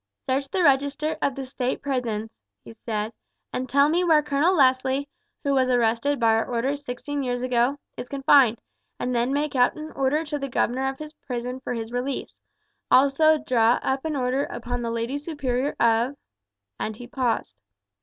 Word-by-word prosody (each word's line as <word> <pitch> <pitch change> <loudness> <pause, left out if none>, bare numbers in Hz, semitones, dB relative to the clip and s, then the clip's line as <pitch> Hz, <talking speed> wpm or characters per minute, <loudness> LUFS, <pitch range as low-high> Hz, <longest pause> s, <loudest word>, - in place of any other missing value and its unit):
"Search 270 +1 0
the 370 +3 0
register 285 +2 +2
of 275 - 0
the 270 - -5
state 255 -1 -3
prisons," 230 -5 -2 0.3
he - - -10
said, 220 0 -4 0.4
"and 255 0 -3
tell 280 +3 +5
me 340 +4 +2
where 315 -4 +4
Colonel 295 +5 +2
Leslie, 265 -1 +2 0.4
who 280 - +1
was 260 -1 +2
arrested 245 +3 +1
by 225 -1 +4
our 225 0 +2
orders 265 +4 -1
sixteen 285 +2 -4
years 245 -1 -2
ago, 250 +2 +1 0.2
is 250 - -7
confined, 270 -4 +4 0.4
and 250 - -1
then 240 +2 +1
make 290 +1 -1
out 245 -1 +3
an 310 0 -7
order 275 +4 0
to 295 -1 -3
the 275 0 -4
governor 260 +2 0
of 270 - -6
his 305 +1 -9
prison 250 -3 -5
for 250 -1 -4
his 225 0 -5
release; 250 +3 -3 0.5
also 280 +4 +5
draw 245 -5 +3
up 265 0 -1
an 315 -2 -2
order 260 +1 0
upon 245 0 -5
the 235 - -2
lady 230 +5 -2
superior 285 -3 -2
of 230 +4 +2 0.3
," 100 0 -59
and 220 - -3
he 245 - -10
paused. 245 - -2
260 Hz, 185 wpm, -25 LUFS, 240-285 Hz, 0.5 s, tell